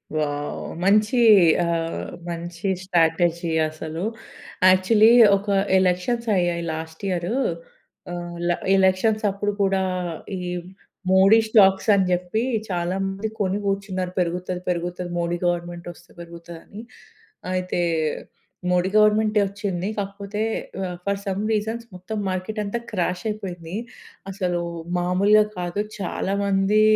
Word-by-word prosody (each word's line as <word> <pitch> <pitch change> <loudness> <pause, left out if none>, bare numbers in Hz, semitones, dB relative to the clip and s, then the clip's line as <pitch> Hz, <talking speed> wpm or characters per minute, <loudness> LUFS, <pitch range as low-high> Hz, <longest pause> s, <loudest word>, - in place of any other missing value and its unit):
Wow! 145 -1 -2 0.2
మంచి 215 +5 +3 0.5
ఆహ్, 165 -1 -2 0.2
మంచి 170 +2 -4
స్ట్రాటజీ 170 -1 +1 0.2
అసలు. 160 +2 -6 0.7
యాక్చువల్లీ, 210 +4 +5 0.3
ఒక 200 +2 -10 0.3
ఎలక్షన్స్ 185 +6 0
అయ్యాయి 175 -1 0
లాస్ట్ 160 +2 -7
ఇయరు 180 +4 -1 0.8
ఆహ్, 175 0 -6
ల - - +4 0.3
ఎలక్షన్స్ 190 +3 +2
అప్పుడు 205 +1 -2
కూడా 195 -1 +1 0.6
ఈ - - -5 0.7
మోడీ 190 +3 +6
స్టాక్స్ 195 -1 +5
అని 195 -2 +3
జెప్పి 180 +5 0 0.3
చాలా 175 0 -1
మంది 195 +3 -3
కొని 195 0 +1
గూర్చున్నారు 195 -2 -2
పెరుగుతది, 180 +1 -2
పెరుగుతది 175 0 -3
మోడీ 170 0 -1
గవర్నమెంట్ 175 0 -3
ఒస్తే 175 - -20
బెరుగుతదని. 170 +3 -10 0.7
అయితే 185 -1 -2 0.9
మోడీ 180 +1 +2
గవర్నమెంటే 215 0 +4
ఒచ్చింది. 195 -2 -3
కాకపోతే 200 +1 -4 0.4
ఆహ్, 180 -1 -4
ఫర్ 200 0 0
సమ్ 195 0 -2
రీజన్స్ 220 +2 -2
మొత్తం 185 +5 -6
మార్కెట్ 185 +4 -3
అంతా 205 +4 -3
క్రాష్ 180 -2 -1
అయిపోయింది. 180 -5 -6 0.6
అసలు 180 -2 -1 0.4
మామూలుగా 195 +4 +4
కాదు. 175 +3 -2 0.2
చాలామంది 200 +2 +1
185 Hz, 110 wpm, -23 LUFS, 175-200 Hz, 0.9 s, మోడీ